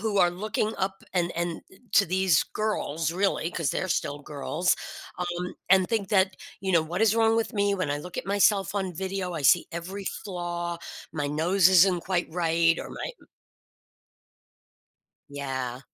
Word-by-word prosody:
who 215 -1 -1
are 175 -2 +5
looking 210 +3 -2
up 190 0 -2
and 175 -1 +1
and 170 -1 -2 0.3
to 200 - +5
these 185 -2 +3
girls, 165 -7 -1
really, 190 -3 0
'cause 165 -5 -1
they're 185 - -1
still 145 -3 -1
girls, 155 +4 0 0.4
um, 180 0 -3
and 190 -1 +5
think 215 -5 -1
that, 190 -1 +3 0.3
you 190 -1 -1
know, 165 - +5
"What 175 +6 -2
is 220 0 +4
wrong 225 0 +3
with 230 - 0
me 200 -1 +1
when 185 -7 -2
I 145 - -1
look 180 +4 -9
at - - -3
myself 200 -1 +2
on 190 -3 -2
video? 190 0 -3
I 155 - -4
see 170 +5 +5
every 190 +4 -6 0.2
flaw. 175 -2 -4 0.3
My 145 -3 -2
nose 170 +5 +3
isn't 185 -1 +5
quite 180 -3 -1
right 165 -1 +2
or - - -6
my" - - -5 2.2
Yeah. 130 -3 -4
180 Hz, 165 wpm, -27 LUFS, 165-195 Hz, 2.2 s, are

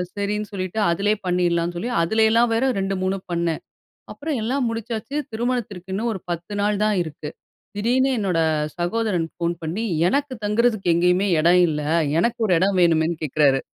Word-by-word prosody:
சரின்னு 205 +1 -2
சொல்லிட்டு 185 +1 -4
அதிலயே 205 +5 +1
பண்ணிறலாம்ன்னு 175 -1 0
சொல்லி, 230 +8 -3
அதுல 220 +7 +2
எல்லாம் 230 +1 +3
வேற 225 +3 +1 0.2
2, 195 0 -1
3 190 +1 0
பண்ணேன். 170 -2 -1 0.5
அப்புறம் 295 -2 -3
எல்லாம் 250 +3 0
முடிச்சாச்சு, 230 +4 -4 0.2
திருமணத்திற்கு 220 -6 -3
இன்னும் 230 +4 -1
ஒரு 190 - -5
10 175 +4 -4
நாள் 205 0 0
தான் 215 -1 +2
இருக்கு. 155 -2 -7 0.5
திடீர்னு 250 +6 +2
என்னோட 185 -5 0 0.4
சகோதரன் 175 -1 -1
ஃபோன் 170 0 -1
பண்ணி, 170 +8 -3 0.2
எனக்கு 280 +3 0
தங்கறதுக்கு 210 -3 +2
எங்கேயுமே 180 +3 +2
இடம் 175 +3 +5
இல்ல, 150 -1 -2 0.4
எனக்கு 235 +5 0
ஒரு 185 - +3
இடம் 190 0 +2
வேணுமேன்னு 165 -1 +2
கேக்குறாரு. 140 -2 +2
195 Hz, 155 wpm, -22 LUFS, 170-225 Hz, 0.5 s, இடம்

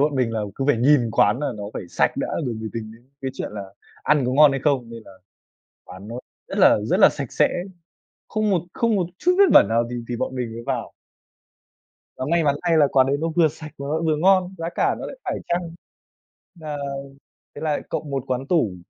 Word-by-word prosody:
bọn 145 0 +2
mình 125 -3 0
là 110 - -1
cứ 135 - -3
phải 145 -5 +4
nhìn 125 -1 +3
quán 105 +2 +3
là 145 - -1
nó 100 - -6
phải - - -4
sạch - - +1
đã - - -2 0.2
rồi 120 - -2
mới 110 0 -5
tính 110 -1 -6
đến 120 +3 -19
cái 135 - -3
chuyện - - -5
là 105 -2 -5 0.4
ăn 150 -3 +2
có 125 - 0
ngon 150 +2 +7
hay 135 -1 -2
không, 130 -6 +1
nên 115 -1 -9
là - - -14 0.7
quán 95 +3 -11
nó 115 - -7 0.3
rất - - -5
là - - +6
rất - - +1
là - - +8
sạch - - -6
sẽ, - - +3 0.8
không 215 -1 0
một 185 -4 +2
không 230 -2 +1
một 185 - +1
chút 360 - +2
vết 400 - +7
bẩn - - +8
nào 115 +1 +1
thì 125 - -4
thì 120 - -2
bọn 130 - -3
mình 125 -3 -3
mới 115 - -7
vào. - - -3 1.2
Và 130 - -4
may 170 -1 +2
mắn 140 -1 +3
thay 170 -2 +2
là 145 - +6
quán 130 -1 +5
đấy 140 - +1
nó 165 - 0
vừa 165 -3 +5
sạch 155 0 -10
mà 140 - -5
nó 155 +2 0
vừa 160 -2 +1
ngon, 185 +2 +3
giá 165 0 -3
cả - - +2
nó - - -5
lại - - -8
phải - - -2
chăng. 175 -1 -2 0.9
À, 150 -1 -5 0.8
thế - - -8
là 155 -2 -1
cộng 150 - -4
một 135 -2 -2
quán 130 +1 -2
tủ. 115 - +1
140 Hz, 240 wpm, -23 LUFS, 120-160 Hz, 1.2 s, là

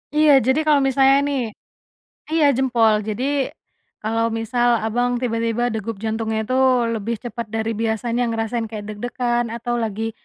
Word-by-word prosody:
Iya. 300 -2 +6
Jadi 260 +4 +1
kalau 300 -2 +4
misalnya 270 0 +4
nih 280 -2 -1 0.9
iya, 310 -3 +4
jempol. 235 -5 +3
Jadi 265 +6 0 0.6
kalau 225 +1 0
misal 240 +1 +1
Abang 245 +3 0
tiba-tiba 230 0 0
degup 220 0 -4
jantungnya 220 0 -1
itu 255 +4 -3 0.4
lebih 225 +1 -2
cepat 235 -1 -5
dari 220 0 -1
biasanya, 230 +2 -1
ngerasain 225 0 -2
kayak 215 -2 -7
deg-degan, 240 +2 -1
atau 240 +1 -2
lagi 225 0 -2
235 Hz, 140 wpm, -21 LUFS, 225-250 Hz, 0.9 s, Iya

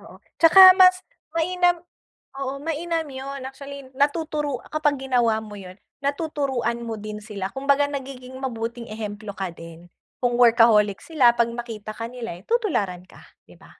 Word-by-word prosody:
Oo, - - -14 0.2
tsaka 370 +3 +10
mas 370 0 +5 0.3
mainam 355 +1 +2 0.6
oo, 275 0 -4
mainam 325 +1 -2
yun. 275 +1 -7
Actually, 275 0 -10
natuturu 295 -1 -1
kapag 295 -3 0
ginawa 235 -4 +2
mo 210 -1 -10
yun, 185 -2 -10 0.3
natuturuan 280 -5 -2
mo 225 -2 -5
din 210 0 -6
sila, 200 -3 -5
kumbaga 280 +1 +2
nagiging 260 -2 -7
mabuting 235 -2 -5
ehemplo 210 -1 -6
ka 190 -1 -4
din. 165 0 -13 0.3
Kung 245 -1 +1
workaholic 225 -4 +5
sila 285 -7 +4
'pag 235 -1 +2
makita 230 -3 -7
ka 230 +1 -4
nila 240 -8 -7
eh, 175 - -16
tutularan 295 - -1
ka, - - -16 0.3
di - - -16
ba? - - -18
260 Hz, 150 wpm, -23 LUFS, 220-290 Hz, 0.6 s, tsaka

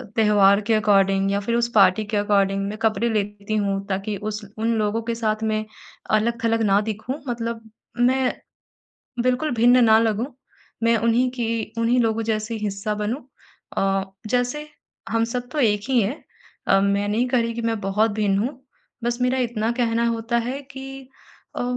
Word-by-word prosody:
त्योहार 205 -2 +5
के 230 - +3
अकॉर्डिंग 195 -2 +3
या 200 - +1
फिर 230 +4 -1
उस 235 0 +2
पार्टी 195 +1 +5
के 210 0 -2
अकॉर्डिंग 195 -1 +2
मैं 210 - -6
कपड़े 225 +1 +1
लेती 205 -1 -2
हूँ 200 -1 -1
ताकि 195 +2 -2
उस 210 +2 -4 0.2
उन 225 +1 0
लोगों 215 +1 0
के 230 0 -2
साथ 220 -1 -1
में 215 0 0 0.5
अलग-थलग 230 +1 +1
ना 200 -1 +4
दिखूँ। 225 +7 -4
मतलब 230 -1 -3 0.4
मैं 255 +1 +2 0.9
बिल्कुल 255 +5 +1
भिन्न 245 +2 +5
ना 220 -1 +6
लगूँ 225 +1 +1 0.6
मैं 230 0 +4
उन्हीं 235 +3 +2
की 230 -3 -3
उन्हीं 230 +2 +2
लोगों 225 -1 +1
जैसी 220 0 -2
हिस्सा 210 0 -2
बनूँ 210 +7 -3 0.6
औ 195 0 +1 0.3
जैसे 250 +5 0 0.4
हम 230 0 +1
सब 245 +1 -4
तो 305 - -3
एक 210 -5 +2
ही 255 -2 +4
है। 235 +10 -3 0.5
अ, 195 - +5
मैं 200 +1 +1
नहीं 225 +4 +1
कह 250 -1 +2
रही 230 0 -1
कि 235 - -4
मैं 225 -2 -1
बहुत 210 +3 +1
भिन्न 205 -2 +1
हूँ, 255 +5 -3 0.4
बस 240 0 -1
मेरा 250 +1 +1
इतना 230 -3 -1
कहना 235 -1 +1
होता 230 +1 -1
है 250 +4 -3
कि 270 -1 -9 0.5
अ, - - -1
225 Hz, 175 wpm, -23 LUFS, 205-235 Hz, 0.9 s, ना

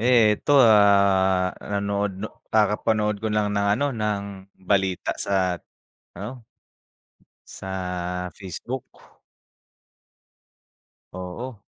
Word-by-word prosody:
Ito, 120 +3 +4
ah, 100 -3 +4
nanood 100 0 -1 0.4
kakapanood 105 0 +1
ko 110 - -1
lang 105 -1 0
ng 100 0 +1
ano, 145 - +1
ng, 105 -3 -1 0.4
balita 95 -2 +1
sa 95 -3 0 0.5
ano 115 +6 -8 1.1
sa 90 -1 -4
Facebook. 110 +7 -6 2.3
Oo. 100 +6 -7
100 Hz, 75 wpm, -24 LUFS, 95-105 Hz, 2.3 s, Ito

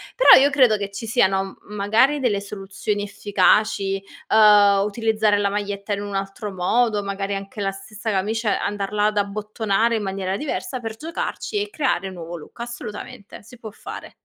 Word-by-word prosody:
Però - - +8
io 280 - +5
credo 255 -7 +4
che 200 -1 -4
ci 200 +3 -7
siano 195 -4 +2 0.2
m 210 - -12
magari 220 +8 +3
delle 220 -7 0
soluzioni 200 +1 -4
efficaci, 205 -1 +1 0.3
uhm, 205 -2 +6
utilizzare 215 0 +1
la 200 -1 +1
maglietta 205 0 -3
in 200 - -3
un 205 -1 -5
altro 195 +2 -4
modo. 205 +3 +1
Magari 200 0 -3
anche 195 +1 -7
la 195 - 0
stessa 195 +3 -7
camicia, 210 +2 0
andarla 205 0 -1
ad 210 0 0
abbottonare 215 +2 0
in - - -3
maniera 190 0 -2
diversa 275 -2 -4
per 225 -2 -6
giocarci 335 - -4
e 415 - -4
creare 260 - -1
un 190 - -8
nuovo 170 0 -7
look, 165 +7 -12
assolutamente, 210 -4 -8
si 240 +3 -15
può 220 - -8
fare. 210 - -9
205 Hz, 175 wpm, -22 LUFS, 195-225 Hz, 0.3 s, Però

